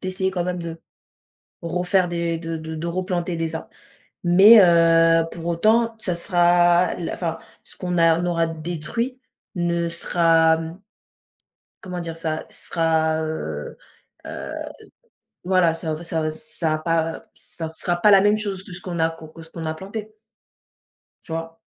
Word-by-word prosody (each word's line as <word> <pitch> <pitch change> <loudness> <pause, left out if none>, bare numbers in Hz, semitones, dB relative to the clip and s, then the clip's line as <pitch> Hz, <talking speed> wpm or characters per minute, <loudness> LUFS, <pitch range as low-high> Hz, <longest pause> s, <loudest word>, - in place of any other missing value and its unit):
d'essayer 185 0 -1
quand 180 -2 -2
même 180 -1 -3
de 165 -1 -7 0.8
refaire 180 +2 +1
des 170 -1 -1
de 165 -1 -4
de 160 0 -7
de 160 +2 -4
replanter 180 0 -2
des 165 0 -3
arbres. - - -7 0.5
Mais 195 +6 +8
heu, 165 -1 +5
pour 165 -1 -8
autant, 220 +7 +2
ça 185 -5 -1
sera 175 0 +3
la 170 - -4
enfin, 165 -2 -3 0.3
ce - - -12
qu'on 180 -1 -2
a 165 -1 +5
on - - -2
aura 170 -1 +1
détruit, 170 - -4 0.4
ne 170 -1 0
sera, 165 -1 +3
mmh 165 +2 -7 1.1
comment 180 -2 -5
dire 165 -1 -6
ça, 160 -1 -3
sera, 160 -1 0
heu 80 - -5 0.5
heu, - - -6 0.9
voilà, 180 -2 +3
ça 165 -1 -4
ou 155 +2 -6
ça 165 -1 -2
v 155 - 0
ça 165 -3 -2
a - - 0
pas 165 0 0
heu, - - -14
ça 165 - -5
sera 175 +2 -1
pas 205 +4 +5
la 195 -1 +7
même 205 +1 +3
chose 200 -3 -3
que 195 - -11
ce 180 - -9
qu'on 175 -2 -5
a 160 0 +3
co 165 -1 -11
que 165 - -13
ce 160 - -13
qu'on 165 -1 -7
a 155 - -2
planté. 210 +5 -7 1.1
Tu 160 - -9
vois? 165 0 -5
170 Hz, 170 wpm, -22 LUFS, 165-180 Hz, 1.1 s, Mais